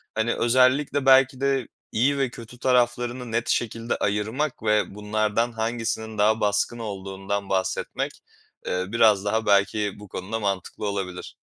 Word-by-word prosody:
Hani, 110 +1 +1
özellikle 130 +3 +2
belki 135 0 +5
de 135 -3 +1 0.2
iyi 135 +5 +2
ve 135 -2 +1
kötü 120 +1 -12
taraflarını 120 -1 +1
net 115 +1 -1
şekilde 115 0 -1
ayırmak 110 +8 -1
ve 105 -2 +1
bunlardan 110 +2 0
hangisinin 110 -1 -3
daha 110 +2 +3
baskın 105 +3 +1
olduğundan 100 -1 -4
bahsetmek, 95 -1 -1 0.5
eee, 90 0 -1
biraz 105 -2 +3
daha 110 +2 0
belki 100 0 +2
bu 105 - -11
konuda 100 +4 -4
mantıklı 100 0 -3
olabilir. 95 -3 -4
110 Hz, 135 wpm, -25 LUFS, 100-120 Hz, 0.5 s, belki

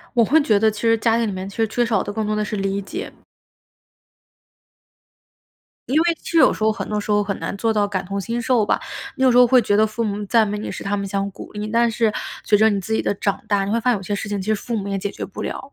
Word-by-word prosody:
我 235 -2 +5
会 310 +8 +4
觉 215 -6 +3
得 220 +1 +3
其 210 - -8
实 230 -1 +3
家 225 +1 +2
庭 235 - +1
里 205 - -2
面， 185 +1 -5
其 200 - -12
实 225 -1 +2
缺 240 +2 0
少 225 -4 +1
的 205 - -5
更 220 0 -2
多 215 - 0
的 210 0 0
是 210 - -4
理 195 0 -1
解。 - - -6 2.8
因 275 +5 +2
为 340 0 +2
其 - - -7
实 - - 0
有 305 - +6
时 - - -6
候 220 - +4
很 - - -4
多 210 0 -1
时 210 - -6
候， 205 0 +3
很 200 -1 -3
难 - - -4
做 225 +2 +1
到 205 -1 +1
感同身受 210 +5 -1
吧。 - - +1 0.4
你 265 - +1
有 255 - +5
时 245 - +5
候 250 - +8
会 255 0 +5
觉 205 - +1
得 215 +1 +4
父 225 +2 -3
母 205 0 -2
赞 225 +1 +3
美 205 +1 -3
你 215 - -5
是 - - -7
他 205 +1 -1
们 200 - -3
想 195 0 -1
鼓 - - -11
励， 210 0 -4
但 230 +2 +2
是 225 -1 +1 0.3
随 210 - +4
着 220 +1 +5
你 205 - +1
自 220 +4 -5
己 - - +2
的 - - -1
长 200 0 -2
大， 200 -2 +2
你 200 - -2
会 230 - +1
发 250 - +2
现 240 - +2
有 195 - -7
些 205 +2 -3
事 205 - -4
情， 205 -1 -2
其 190 - -7
实 215 - +3
父 235 +3 -4
母 200 -2 -3
也 195 0 -1
解 200 +1 -3
决 - - -6
不 - - -9
了， 280 - -6
215 Hz, 330 characters per minute, -21 LUFS, 200-230 Hz, 2.8 s, 候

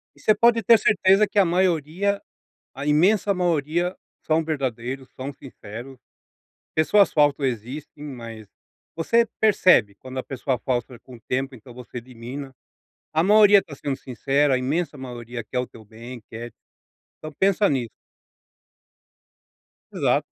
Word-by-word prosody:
E - - -22
você 215 - +4
pode 230 +2 +3
ter 230 +4 +7
certeza 200 0 +4
que 205 - -7
a 195 - +5
maioria, 180 +2 0 0.5
a 140 +2 -6
imensa 190 +7 +3
maioria 175 0 0 0.3
são 160 0 +1
verdadeiros, 130 -3 -3
são 135 +2 -5
sinceros. 125 0 -11 0.8
Pessoas 195 +6 +4
falsas 145 -2 +3
existem, 130 +5 -6
mas, 115 -6 -9 0.5
você 230 +8 +3 0.2
percebe 185 - +4
quando 130 +3 -8
a - - -2
pessoa 130 -1 -2
falsa 125 -1 -3
com 130 - -14
o 115 - -19
tempo, 130 +3 -3
então 125 +1 -14
você 125 0 -9
elimina. 125 +3 -8 0.6
A 160 - +3
maioria 205 0 +7
tá 145 - -11
sendo 135 -1 -4
sincera, 135 +3 0
a 130 - +3
imensa 145 +5 -2
maioria 120 -2 -7
quer 125 +3 -3
o 125 - -2
teu 110 - -15
bem, 115 +3 -11
quer 115 +1 -8 0.7
Então 155 0 -8
pensa 200 +1 +3
nisso. 125 -5 -1 2.0
Exato. - - +1
140 Hz, 140 wpm, -23 LUFS, 125-180 Hz, 2.0 s, ter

